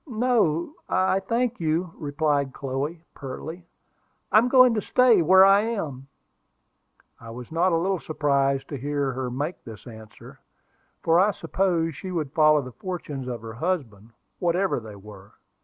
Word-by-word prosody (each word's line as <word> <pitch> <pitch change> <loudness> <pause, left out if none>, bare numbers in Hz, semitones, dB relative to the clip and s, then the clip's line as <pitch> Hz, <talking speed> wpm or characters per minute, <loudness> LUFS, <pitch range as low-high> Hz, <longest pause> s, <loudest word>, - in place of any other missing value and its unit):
"No, 225 - 0 0.2
I 185 +1 +2
thank 235 +4 -1
you!" 165 +2 -1
replied 145 -3 -1
Chloe, 140 +5 -4
pertly. 160 +6 -8 0.6
"I'm 220 +3 +5
going 255 -1 +6
to 215 - -1
stay 245 -5 +4
where 190 +4 +7
I 195 +1 +6
am." 160 - -4 1.1
I 115 - -11
was 120 +3 -9
not 175 +3 +2
a 165 - +2
little 185 +2 0
surprised 140 -3 0
to 145 - -5
hear 145 0 -1
her 130 0 -4
make 145 +8 -4
this 110 -3 -11
answer, 110 -2 -13 0.6
for 165 +1 +4
I 195 +3 +4
supposed 175 -6 -1
she 190 - -7
would 155 -6 -3
follow 155 -2 +4
the 130 - -9
fortunes 150 -5 -6
of 120 -3 -5
her 110 0 -7
husband, 115 - -3 0.3
whatever 180 0 0
they 110 -2 -11
were. 100 -1 -14
160 Hz, 155 wpm, -25 LUFS, 135-185 Hz, 1.1 s, where